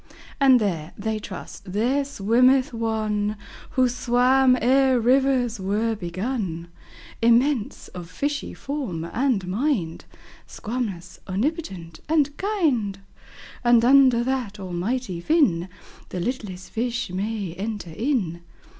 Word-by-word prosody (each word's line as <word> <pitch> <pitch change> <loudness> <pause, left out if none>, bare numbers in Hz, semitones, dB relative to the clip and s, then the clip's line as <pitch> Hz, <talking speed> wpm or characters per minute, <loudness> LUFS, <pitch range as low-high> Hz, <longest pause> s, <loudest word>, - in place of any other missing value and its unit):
And 265 -3 +6
there 170 -7 -2
(they 220 +1 -2
trust) 190 -1 -9
there 250 +7 +1
swimmeth 255 +2 +3
One 215 -2 -1 0.4
Who 255 -1 +5
swam 250 +2 +3
ere 260 +1 +4
rivers 250 -1 +2
were 210 +4 0
begun, 185 -2 -4 0.5
Immense, 235 +1 +2
of 175 -2 -9
fishy 285 +7 -3
form 260 - -4
and 230 +2 0
mind, 195 - -1 0.4
Squamous, 210 -7 -5
omnipotent, 195 - -3
and 295 -2 +2
kind; 275 - 0 0.6
And 240 -1 +5
under 260 -2 +6
that 245 -5 -2
Almighty 190 +2 -3
Fin, 190 - +2 0.4
The 180 - -4
littlest 190 -3 -4
fish 240 -2 -2
may 200 -1 -3
enter 205 -2 -5
in. 195 - -1
230 Hz, 110 wpm, -24 LUFS, 190-260 Hz, 0.6 s, And